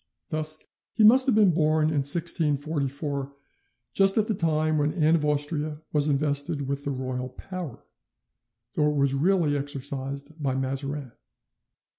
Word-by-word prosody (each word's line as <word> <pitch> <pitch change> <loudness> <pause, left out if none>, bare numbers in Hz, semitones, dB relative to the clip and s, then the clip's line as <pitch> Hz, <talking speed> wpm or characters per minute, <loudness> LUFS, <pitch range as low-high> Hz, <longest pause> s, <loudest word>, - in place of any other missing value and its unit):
Thus 155 0 -1 0.4
he 225 - +3
must 255 +5 +6
have 255 - +3
been 205 -5 +4
born 155 -1 +2
in 155 - -2
1644, 145 -2 0 0.6
just 195 +1 +5
at 215 -1 +2
the 220 - 0
time 155 -3 0
when 145 +1 0
Anne 160 -2 +2
of 155 - -1
Austria 150 +1 -2
was 150 -1 +2
invested 145 0 0
with 140 +1 -4
the - - -2
royal 130 -1 -4
power, 180 -1 -8 0.9
though 150 -1 +1
it 150 - -2
was 140 -1 +1
really 160 0 +1
exercised 140 +1 -5
by 135 -2 -1
Mazarin. 135 0 -4
150 Hz, 145 wpm, -25 LUFS, 140-160 Hz, 0.9 s, must